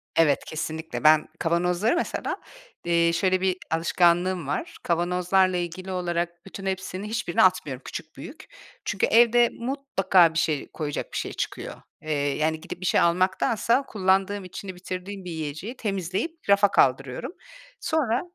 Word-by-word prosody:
Evet. 150 Hz, -4 st, +3 dB
Kesinlikle. 160 Hz, +1 st, -5 dB
Ben 155 Hz, 0 st, +6 dB
kavanozları 180 Hz, -, +1 dB
mesela, 345 Hz, -, -2 dB, 0.5 s
eee, 170 Hz, -1 st, +3 dB
şöyle 185 Hz, +2 st, +1 dB
bir 185 Hz, -1 st, +1 dB
alışkanlığım 175 Hz, 0 st, +2 dB
var. 145 Hz, -, -3 dB
Kavanozlarla 180 Hz, +2 st, +2 dB
ilgili 180 Hz, +2 st, -4 dB
olarak 175 Hz, -1 st, -2 dB
bütün 195 Hz, 0 st, -9 dB
hepsinin 190 Hz, 0 st, -3 dB
hiçbirini 220 Hz, -5 st, 0 dB
atmıyorum, 155 Hz, -8 st, +2 dB
küçük, 160 Hz, -, -7 dB
büyük. 330 Hz, +8 st, -10 dB, 0.4 s
Çünkü -, -, +1 dB
evde 240 Hz, +1 st, +5 dB
mutlaka 195 Hz, -, +2 dB
bir 165 Hz, -, +1 dB
şey 150 Hz, -4 st, 0 dB
koyacak 150 Hz, -3 st, -4 dB
bir -, -, -2 dB
şey -, -, -3 dB
çıkıyor. -, -, -5 dB, 0.2 s
Eee, 155 Hz, 0 st, -5 dB, 0.3 s
yani, 160 Hz, +1 st, 0 dB
gidip 180 Hz, +1 st, -8 dB
bir -, -, -4 dB
şey -, -, +3 dB
almaktansa 190 Hz, +8 st, +2 dB
kullandığım 195 Hz, 0 st, +1 dB
içini 185 Hz, +1 st, -8 dB
bitirdiğim 185 Hz, +1 st, -6 dB
bir 175 Hz, -, -5 dB
yiyeceği 160 Hz, -, -5 dB
temizleyip 200 Hz, -, -3 dB
rafa 200 Hz, 0 st, +5 dB
kaldırıyorum. 135 Hz, -, +1 dB, 0.5 s
Sonra... 265 Hz, -7 st, 0 dB
180 Hz, 140 wpm, -25 LUFS, 165-200 Hz, 0.5 s, Ben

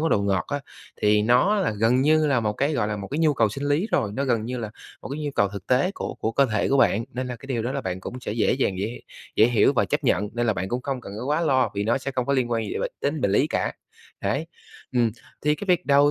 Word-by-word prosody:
món 165 Hz, -, +1 dB
đồ 100 Hz, -, +3 dB
ngọt 95 Hz, -2 st, +1 dB
á, 145 Hz, 0 st, -2 dB, 0.4 s
thì 105 Hz, 0 st, +4 dB
nó 125 Hz, -, +4 dB
là 195 Hz, -5 st, +1 dB
gần 120 Hz, +3 st, +4 dB
như 155 Hz, +2 st, +4 dB
là 135 Hz, -5 st, +2 dB
một 105 Hz, -1 st, 0 dB
cái 140 Hz, +8 st, 0 dB
gọi 110 Hz, -6 st, 0 dB
là, 105 Hz, -, -2 dB
một 100 Hz, -1 st, -6 dB
cái 145 Hz, -, -3 dB
nhu 155 Hz, -3 st, +3 dB
cầu 115 Hz, -3 st, +3 dB
sinh 135 Hz, +7 st, -5 dB
lý 155 Hz, +9 st, +2 dB
rồi, 105 Hz, -2 st, +1 dB
nó 140 Hz, +3 st, -1 dB
gần 115 Hz, -4 st, +1 dB
như 125 Hz, +2 st, -4 dB
là 110 Hz, -3 st, -4 dB, 0.3 s
một -, -, -7 dB
cái 140 Hz, +3 st, -5 dB
nhu 145 Hz, -, -1 dB
cầu 100 Hz, -1 st, +3 dB
thực 100 Hz, -2 st, -8 dB
tế 130 Hz, +9 st, +2 dB
của -, -, -4 dB
của 110 Hz, -, -2 dB
cơ 140 Hz, +3 st, +4 dB
thể 105 Hz, -1 st, +1 dB
của 140 Hz, -, +3 dB
bạn. 115 Hz, -3 st, +3 dB
Nên 130 Hz, +1 st, -3 dB
là 125 Hz, -1 st, -5 dB
cái 135 Hz, -, -13 dB
điều 120 Hz, -4 st, -1 dB
đó 125 Hz, +3 st, -2 dB
là 140 Hz, -, -2 dB
bạn 95 Hz, -4 st, -4 dB
cũng 125 Hz, +6 st, -7 dB
sẽ 115 Hz, -, -4 dB
dễ 110 Hz, 0 st, +2 dB
dàng 100 Hz, -8 st, 0 dB
dễ 100 Hz, -, -1 dB
h 120 Hz, -, -6 dB, 0.4 s
dễ 110 Hz, -, +6 dB
hiểu 120 Hz, -2 st, +4 dB
và -, -, +2 dB
chấp -, -, -2 dB
nhận, 105 Hz, 0 st, +2 dB
nên 120 Hz, 0 st, 0 dB
là 110 Hz, -, +3 dB
bạn 95 Hz, -2 st, -3 dB
cũng 125 Hz, +1 st, -2 dB
không 135 Hz, -1 st, -3 dB
cần 100 Hz, -, -9 dB
có -, -, -4 dB
quá 150 Hz, +3 st, +1 dB
lo 135 Hz, -6 st, +2 dB
vì 100 Hz, -, -1 dB
nó 120 Hz, +4 st, +2 dB
sẽ 135 Hz, +1 st, -4 dB
không 125 Hz, -2 st, -2 dB
có 140 Hz, -, +1 dB
liên 130 Hz, -3 st, +1 dB
quan 115 Hz, -1 st, 0 dB
gì -, -, -3 dB
bệnh -, -, -2 dB
đến 145 Hz, +2 st, -1 dB
bệnh 100 Hz, -, +1 dB
lý -, -, +3 dB
cả, -, -, -1 dB, 0.5 s
đấy. 140 Hz, +11 st, -1 dB, 0.5 s
Ừm, 120 Hz, -3 st, +3 dB, 0.3 s
thì 150 Hz, 0 st, +3 dB
cái 205 Hz, -, -7 dB
việc 180 Hz, -1 st, +2 dB
đầu 145 Hz, +1 st, +5 dB
125 Hz, 310 wpm, -24 LUFS, 110-140 Hz, 0.5 s, dễ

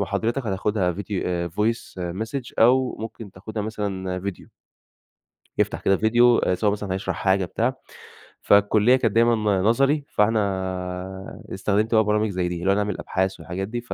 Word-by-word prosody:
محاضرتك 110 Hz, +6 st, -1 dB
هتاخدها 95 Hz, -2 st, 0 dB
فيديو 90 Hz, -3 st, -3 dB
Voice 110 Hz, +6 st, -2 dB, 0.3 s
message 125 Hz, +1 st, -6 dB
أو 125 Hz, +2 st, +4 dB
ممكن 110 Hz, -1 st, -7 dB
تاخدها 105 Hz, +3 st, -6 dB
مثلًا 95 Hz, -4 st, -3 dB
فيديو. 100 Hz, -1 st, -6 dB, 1.1 s
يفتح -, -, 0 dB
كده 95 Hz, -, +3 dB
فيديو، 120 Hz, +3 st, +4 dB
آآ 90 Hz, -, +1 dB
سواء 100 Hz, +3 st, +1 dB
مثلًا 105 Hz, -2 st, -3 dB
هيشرح 95 Hz, -2 st, -3 dB
حاجة 95 Hz, +1 st, +1 dB
بتاع. 120 Hz, +8 st, -1 dB, 0.7 s
فالكلية 105 Hz, +4 st, +4 dB
كانت 115 Hz, -4 st, 0 dB
دايمًا 115 Hz, 0 st, +4 dB
ن 105 Hz, -4 st, +1 dB
نظري، 135 Hz, +7 st, +2 dB
فاحنا 95 Hz, -3 st, -2 dB
استخدمت 105 Hz, +3 st, 0 dB
بقى 110 Hz, -, +5 dB
برامج 105 Hz, 0 st, +1 dB
زي 90 Hz, -2 st, -1 dB
دي، 90 Hz, -1 st, -4 dB
اللي 95 Hz, +2 st, +2 dB
هو -, -, +3 dB
نعمل 105 Hz, -1 st, -1 dB
أبحاث 95 Hz, 0 st, -2 dB
والحاجات 95 Hz, +3 st, -5 dB
دي. 120 Hz, +2 st, -4 dB
ف 120 Hz, -, -7 dB
105 Hz, 160 wpm, -23 LUFS, 95-110 Hz, 1.1 s, بقى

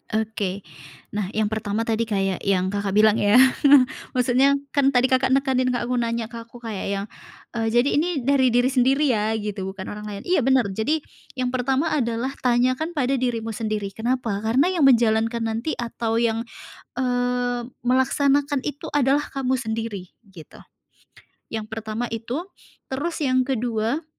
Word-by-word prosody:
Oke. 205 Hz, -3 st, -2 dB, 0.5 s
Nah, 205 Hz, -2 st, -2 dB
yang 215 Hz, -1 st, 0 dB
pertama 215 Hz, 0 st, -2 dB
tadi 230 Hz, 0 st, -1 dB
kayak 195 Hz, -3 st, -1 dB
yang 190 Hz, -1 st, 0 dB
Kakak 200 Hz, -1 st, -2 dB
bilang 215 Hz, 0 st, +5 dB
ya, 205 Hz, 0 st, +3 dB, 0.8 s
maksudnya 255 Hz, +3 st, +3 dB, 0.2 s
kan 280 Hz, -2 st, +2 dB
tadi 260 Hz, -1 st, +3 dB
Kakak 260 Hz, 0 st, +3 dB
nekanin 265 Hz, -2 st, +1 dB
ke 250 Hz, -1 st, 0 dB
aku, 245 Hz, +1 st, -1 dB
nanya 230 Hz, -1 st, -2 dB
ke 235 Hz, -, -7 dB
aku 240 Hz, +1 st, -15 dB
kayak 220 Hz, -4 st, -4 dB
yang, 200 Hz, 0 st, -2 dB, 0.5 s
eee, 225 Hz, -1 st, -2 dB
"Jadi 240 Hz, +4 st, +3 dB
ini, 325 Hz, -, +1 dB, 0.2 s
dari 270 Hz, 0 st, +3 dB
diri 245 Hz, +2 st, +2 dB
sendiri 265 Hz, +3 st, +3 dB
ya," 220 Hz, 0 st, 0 dB
gitu, 205 Hz, -3 st, -4 dB
"bukan 190 Hz, 0 st, -6 dB
orang 210 Hz, 0 st, -7 dB
lain," 200 Hz, -1 st, -7 dB
iya, 360 Hz, -1 st, +2 dB
bener. 260 Hz, -5 st, +2 dB
Jadi 285 Hz, +10 st, -1 dB, 0.3 s
yang 250 Hz, -1 st, -1 dB
pertama 265 Hz, +5 st, 0 dB
adalah 240 Hz, -2 st, -1 dB
tanyakan 255 Hz, +7 st, +1 dB
pada 270 Hz, -2 st, +1 dB
dirimu 230 Hz, -3 st, -2 dB
sendiri, 215 Hz, -3 st, -3 dB
kenapa? 230 Hz, -2 st, -2 dB
Karena 250 Hz, -, +2 dB
yang 330 Hz, -7 st, +3 dB
menjalankan 230 Hz, -2 st, +3 dB
nanti 225 Hz, +7 st, -2 dB
atau 230 Hz, -1 st, -3 dB
yang, 230 Hz, 0 st, 0 dB, 0.5 s
eee, 245 Hz, -1 st, 0 dB, 0.2 s
melaksanakan 280 Hz, +3 st, +2 dB
itu 290 Hz, -1 st, -5 dB
adalah 285 Hz, 0 st, +2 dB
kamu 265 Hz, -1 st, -1 dB
sendiri 220 Hz, -6 st, -4 dB, 0.2 s
gitu, 160 Hz, -4 st, -13 dB, 0.9 s
yang 220 Hz, -1 st, -4 dB
pertama 220 Hz, +1 st, -5 dB
itu. 235 Hz, +8 st, -4 dB, 0.5 s
Terus 310 Hz, +6 st, -2 dB
yang 255 Hz, -1 st, +2 dB
kedua, 240 Hz, +3 st, -1 dB
240 Hz, 155 wpm, -23 LUFS, 220-260 Hz, 0.9 s, bilang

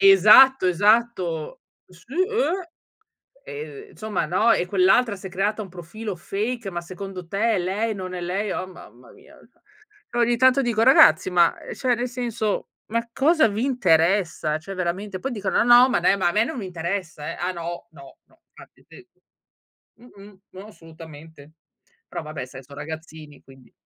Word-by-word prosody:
Esatto, 270 Hz, -, +7 dB
esatto. 185 Hz, -4 st, +1 dB, 0.3 s
Sì, 180 Hz, +8 st, -18 dB
eh! 375 Hz, -1 st, -1 dB, 0.8 s
Ehm, 435 Hz, -2 st, -9 dB
insomma, 215 Hz, -5 st, -3 dB
no. 200 Hz, +7 st, +2 dB
"E 180 Hz, -, +1 dB
quell'altra 200 Hz, +4 st, +3 dB
si 185 Hz, -, -13 dB
è -, -, -11 dB
creata 205 Hz, +3 st, -1 dB
un 190 Hz, -, -12 dB
profilo 185 Hz, +4 st, -7 dB
fake, 215 Hz, +4 st, -4 dB
ma 175 Hz, -1 st, -4 dB
secondo 185 Hz, +1 st, -8 dB
te 215 Hz, +4 st, 0 dB
è -, -, 0 dB
lei, 205 Hz, +5 st, -2 dB
non 185 Hz, -1 st, -7 dB
è 180 Hz, -, -5 dB
lei?" 190 Hz, +3 st, -3 dB
Oh 185 Hz, -, -4 dB
mamma 125 Hz, -9 st, -15 dB
mia, -, -, -19 dB, 0.2 s
cioè. -, -, -36 dB, 0.5 s
E -, -, -4 dB
ogni 240 Hz, 0 st, +2 dB
tanto 260 Hz, +2 st, +4 dB
dico: 235 Hz, -4 st, 0 dB
"Ragazzi, 225 Hz, -9 st, +6 dB
ma, 175 Hz, -2 st, +3 dB
ehm, -, -, -10 dB
cioè 255 Hz, -2 st, 0 dB
nel 240 Hz, +2 st, -3 dB
senso, 235 Hz, -4 st, -3 dB, 0.2 s
ma 230 Hz, +1 st, -2 dB
cosa 310 Hz, -1 st, +3 dB
vi 210 Hz, +4 st, -2 dB
interessa?" 170 Hz, -, +1 dB
Cioè 195 Hz, +5 st, -9 dB
veramente, 185 Hz, +2 st, -4 dB
poi 270 Hz, -, -4 dB
dicono: 200 Hz, -3 st, 0 dB
"No, 245 Hz, +2 st, +7 dB
ma -, -, 0 dB
dai, 200 Hz, -, +2 dB
ma 180 Hz, -, +1 dB
a 175 Hz, -, -1 dB
me 215 Hz, +2 st, +2 dB
non 295 Hz, +1 st, -6 dB
mi 205 Hz, -, -5 dB
interessa 170 Hz, -3 st, -5 dB
eh!" -, -, -7 dB
Ah 180 Hz, +1 st, -2 dB
no? 170 Hz, 0 st, -7 dB
No, 140 Hz, -4 st, -15 dB
no, 330 Hz, 0 st, -30 dB
infatti -, -, -18 dB
te 370 Hz, -, -16 dB, 0.9 s
mh-mh. 205 Hz, -4 st, -17 dB
No, 190 Hz, +2 st, -11 dB
assolutamente. 160 Hz, -5 st, -14 dB, 0.6 s
Però -, -, -5 dB
vabbè, 155 Hz, -3 st, -7 dB
sai, 135 Hz, +1 st, -12 dB
so' 140 Hz, +2 st, -15 dB
ragazzini, 155 Hz, 0 st, -10 dB
quindi 135 Hz, -1 st, -19 dB
195 Hz, 175 wpm, -23 LUFS, 170-235 Hz, 0.9 s, Esatto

